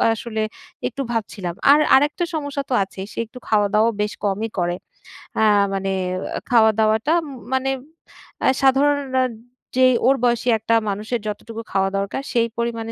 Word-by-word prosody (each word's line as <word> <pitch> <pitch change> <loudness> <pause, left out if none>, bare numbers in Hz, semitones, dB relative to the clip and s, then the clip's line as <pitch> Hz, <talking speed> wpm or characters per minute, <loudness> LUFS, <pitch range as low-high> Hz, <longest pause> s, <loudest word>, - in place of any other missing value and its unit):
আসলে 220 -2 -3 0.4
একটু 275 - -5
ভাবছিলাম। 205 -5 -3 0.2
আর 295 - +7 0.2
আরেকটা 295 +6 +2
সমস্যা 285 -2 -3
তো 255 - -1
আছেই। 190 0 -8
সে - - -6
একটু 230 +3 -13
খাওয়া-দাওয়াও 215 +1 +3
বেশ 210 0 -1
কমই 205 +3 -1
করে। 175 0 0 0.6
অ্যা 220 - +4 0.3
মানে 195 0 -1 0.6
খাওয়া-দাওয়াটা 220 +3 +3
উম - - -8 0.3
মানে 265 0 +1 0.7
অ্যা - - +3
সাধারণ 275 +2 +4 0.2
নার 255 -1 +3 0.5
যেই 255 -1 +6
ওর 270 - +5
বয়সী 240 0 +1
একটা 230 +1 +1
মানুষের 215 +4 -2
যতটুকু 225 +2 -6
খাওয়া 195 0 +1
দরকার, 200 +6 -2
সেই 235 -1 +2
পরিমাণে 230 -1 -2
225 Hz, 150 wpm, -21 LUFS, 210-260 Hz, 0.7 s, আর